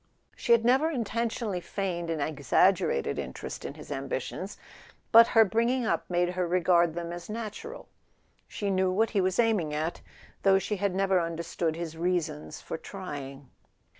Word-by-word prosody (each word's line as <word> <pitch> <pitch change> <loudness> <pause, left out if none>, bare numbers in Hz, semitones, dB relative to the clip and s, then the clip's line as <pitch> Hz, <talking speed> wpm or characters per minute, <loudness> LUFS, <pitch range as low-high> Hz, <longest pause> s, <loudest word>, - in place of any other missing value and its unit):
She - - -2
had 230 -1 +5
never 265 +6 +4
intentionally 230 - -2
feigned 175 -2 -3
an 165 -2 -1
exaggerated 195 - +2
interest - - -6
in - - -6
his - - -11
ambitions. - - -4 0.5
But 230 0 +9
her 225 -2 +6
bringing 235 +4 +1
up - - -1
made 175 0 +1
her 180 0 -1
regard 175 -2 +3
them 170 -1 -4
as 175 +2 -8
natural; 230 - -6 0.6
she 200 -1 -3
knew 190 0 +2
what 215 +5 +1
he 200 - +2
was 185 0 0
aiming 210 -10 +2
at, 160 +3 -2 0.4
though 195 -1 +5
she 205 +2 -2
had 195 -1 -1
never 190 -1 +2
understood 165 -1 -2
his 165 -1 -5
reasons 160 -3 -2
for - - -6
trying. 140 -8 -8
185 Hz, 160 wpm, -28 LUFS, 170-225 Hz, 0.6 s, But